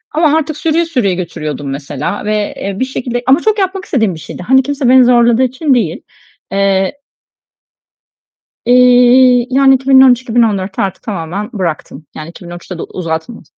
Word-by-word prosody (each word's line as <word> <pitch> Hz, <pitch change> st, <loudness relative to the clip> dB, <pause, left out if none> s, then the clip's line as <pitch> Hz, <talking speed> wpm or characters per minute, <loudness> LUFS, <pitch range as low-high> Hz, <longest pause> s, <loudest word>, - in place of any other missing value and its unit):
ama 315 Hz, -1 st, +3 dB
artık 310 Hz, -1 st, -3 dB
sürüye 330 Hz, +1 st, 0 dB
sürüye 245 Hz, -, -1 dB
götürüyordum 155 Hz, -5 st, -5 dB
mesela 140 Hz, +8 st, -5 dB
ve, 210 Hz, -1 st, -2 dB
eee, 195 Hz, 0 st, -5 dB
bir 260 Hz, -, 0 dB
şekilde 245 Hz, -2 st, -4 dB
ama 270 Hz, +4 st, +4 dB
çok 435 Hz, -1 st, 0 dB
yapmak 380 Hz, 0 st, -2 dB
istediğim 220 Hz, -, -1 dB
bir 160 Hz, -, -10 dB
şeydi. 180 Hz, -, -9 dB
Hani 265 Hz, +6 st, +3 dB
kimse 280 Hz, -2 st, -1 dB
beni 260 Hz, 0 st, +6 dB
zorladığı 240 Hz, 0 st, +3 dB
için 260 Hz, +3 st, 0 dB
değil. 210 Hz, -10 st, -1 dB, 0.5 s
Eee 195 Hz, +5 st, 0 dB, 1.7 s
İii, 250 Hz, 0 st, +4 dB
yani 270 Hz, +1 st, +4 dB
2013-2014'te 245 Hz, -7 st, +2 dB
artık 195 Hz, -2 st, -4 dB
tamamen 195 Hz, 0 st, -5 dB
bıraktım. 165 Hz, -5 st, -5 dB
Yani 155 Hz, +1 st, -8 dB
2013'te 175 Hz, +1 st, -10 dB
de -, -, -6 dB
uzatmadım. 165 Hz, +5 st, -6 dB
240 Hz, 145 wpm, -13 LUFS, 185-265 Hz, 1.7 s, beni